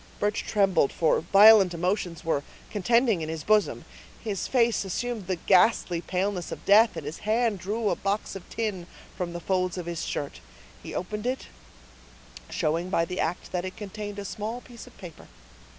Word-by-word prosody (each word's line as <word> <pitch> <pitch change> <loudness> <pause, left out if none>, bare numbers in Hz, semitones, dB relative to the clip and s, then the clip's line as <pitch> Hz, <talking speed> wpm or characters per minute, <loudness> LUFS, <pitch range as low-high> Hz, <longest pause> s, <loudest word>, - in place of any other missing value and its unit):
Birch 205 0 0
trembled, 195 -8 +2
for 160 - +2
violent 195 +1 +7
emotions 180 -1 -2
were 160 -3 +1 0.3
contending 225 -1 +2
in 155 - -4
his 160 -2 -4
bosom. 215 +2 +2 0.4
His 205 -5 -3
face 235 -4 +2
assumed 215 +1 -3
the 185 - 0
ghastly 180 -1 +3
paleness 185 0 -2
of - - -7
death, 210 -1 +5
and 155 - -6
his 150 +2 -6
hand 220 -1 +1
drew 210 +5 -2
a - - +1
box 200 +1 -2
of 195 - -9
tin 205 -6 -3 0.3
from 175 -2 -4
the 175 - -4
folds 185 0 -1
of 180 - -4
his 170 -1 -4
shirt; 145 - -4 0.4
he - - -8
opened 210 +5 -3
it, 260 +1 -3 1.0
showing 165 +4 -1
by 165 -3 +1
the 180 +2 -5
act 170 +2 -2
that 180 -1 -2
it 185 0 -6
contained 205 0 -6
a 200 - -5
small 215 +5 -4
piece 240 -2 -12
of - - -17
paper. 175 -5 -11
195 Hz, 180 wpm, -27 LUFS, 175-215 Hz, 1.0 s, violent